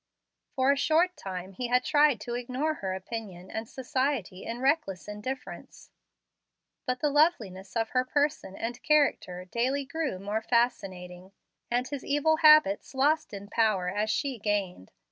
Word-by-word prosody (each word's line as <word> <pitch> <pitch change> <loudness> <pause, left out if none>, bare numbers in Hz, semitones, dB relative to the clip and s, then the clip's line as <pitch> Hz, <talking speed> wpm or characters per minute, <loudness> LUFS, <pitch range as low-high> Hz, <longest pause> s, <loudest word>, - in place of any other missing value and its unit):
For 265 +1 +3
a - - +3
short 330 +5 +2
time 185 -1 -6
he 245 +6 -3
had 250 +1 +2
tried 290 -5 +4
to 240 - -5
ignore 255 +6 -1
her 190 -10 -4
opinion 190 -2 -7
and 220 +1 -5
society 260 -8 -2
in 230 +1 -5
reckless 265 - 0
indifference; 230 +6 -7 1.0
but 250 0 -1
the 295 - +2
loveliness 225 - +1
of 225 -1 0
her 255 0 +1
person 285 -6 -1
and 240 +3 -5
character 275 -12 +1
daily 255 +8 -1
grew 285 - -3
more 205 +3 -3
fascinating, 190 -6 -1 0.4
and 245 +1 0
his 285 -2 -5
evil 295 +2 +2
habits 305 -8 +5
lost 295 +4 +2
in 200 -1 -8
power 205 -4 +1
as 210 +3 -1
she 265 +2 -1
gained. 200 - -2
240 Hz, 150 wpm, -28 LUFS, 195-285 Hz, 1.0 s, habits